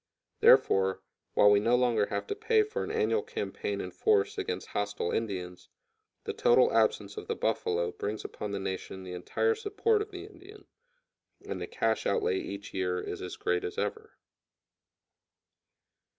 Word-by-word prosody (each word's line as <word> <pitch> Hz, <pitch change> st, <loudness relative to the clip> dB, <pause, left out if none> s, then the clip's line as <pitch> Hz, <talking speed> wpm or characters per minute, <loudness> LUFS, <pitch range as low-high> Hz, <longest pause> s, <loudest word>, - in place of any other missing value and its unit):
Therefore, 95 Hz, 0 st, +5 dB, 0.3 s
while 105 Hz, -, +7 dB
we 100 Hz, -, +6 dB
no 115 Hz, +4 st, +3 dB
longer 120 Hz, -4 st, +2 dB
have -, -, -3 dB
to 415 Hz, -, -3 dB
pay 445 Hz, +1 st, +3 dB
for 430 Hz, +1 st, -3 dB
an -, -, -5 dB
annual 450 Hz, 0 st, +1 dB
campaign 445 Hz, -1 st, -4 dB
in -, -, -5 dB
force 425 Hz, 0 st, +2 dB
against 405 Hz, -2 st, -4 dB
hostile 105 Hz, -3 st, -2 dB
Indians, 90 Hz, -5 st, -4 dB, 0.5 s
the 440 Hz, -, -3 dB
total 470 Hz, +2 st, +4 dB
absence 460 Hz, -1 st, +1 dB
of 430 Hz, -, -6 dB
the 460 Hz, -, -1 dB
buffalo 450 Hz, +1 st, 0 dB
brings 430 Hz, 0 st, -4 dB
upon 105 Hz, -, -5 dB
the 100 Hz, -, -3 dB
nation 95 Hz, 0 st, -5 dB
the 90 Hz, -1 st, -7 dB
entire 90 Hz, -, 0 dB
support 435 Hz, 0 st, +1 dB
of 420 Hz, -, -4 dB
the 380 Hz, -1 st, -8 dB
Indian, 410 Hz, +1 st, -14 dB, 0.8 s
and -, -, -5 dB
the -, -, -4 dB
cash -, -, 0 dB
outlay 445 Hz, -3 st, +1 dB
each 100 Hz, -, -7 dB
year 90 Hz, -1 st, -1 dB
is 90 Hz, -, -5 dB
as 90 Hz, -, -5 dB
great 90 Hz, 0 st, 0 dB
as -, -, -5 dB
ever. 105 Hz, 0 st, -4 dB
410 Hz, 165 wpm, -30 LUFS, -, 0.8 s, while